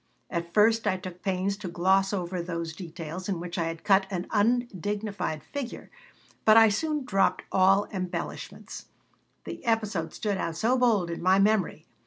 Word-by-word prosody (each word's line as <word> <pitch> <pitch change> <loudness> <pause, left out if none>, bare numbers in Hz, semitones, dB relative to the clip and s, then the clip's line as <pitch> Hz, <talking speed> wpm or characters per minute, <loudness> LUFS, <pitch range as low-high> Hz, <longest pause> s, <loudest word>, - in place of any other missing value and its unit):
At 170 -1 -3
first 220 +2 +3
I 190 -2 +2
took 180 -1 -9
pains 195 0 -1
to 205 -2 -7
gloss 190 +3 +2
over 180 -2 -2
those 170 -2 -4
details 170 +1 -7
in 185 -4 -1
which 175 +1 -5
I 165 - +1
had 165 0 -5
cut 195 -1 +4
an 185 -2 -3
undignified 205 -6 -1
figure, 280 -4 -7 0.5
but 215 0 +7
I 225 -1 +8
soon 300 +6 -1
dropped 195 -5 +1
all 195 +2 +4
embellishments. 185 -2 -5 0.6
The - - -8
episode 215 -8 0
stood 205 -3 -2
out 165 -1 -2
so 225 +9 +2
bold 220 -9 +2
in 170 - -5
my 185 +2 +4
memory. 195 -6 +1
195 Hz, 165 wpm, -27 LUFS, 175-215 Hz, 0.6 s, I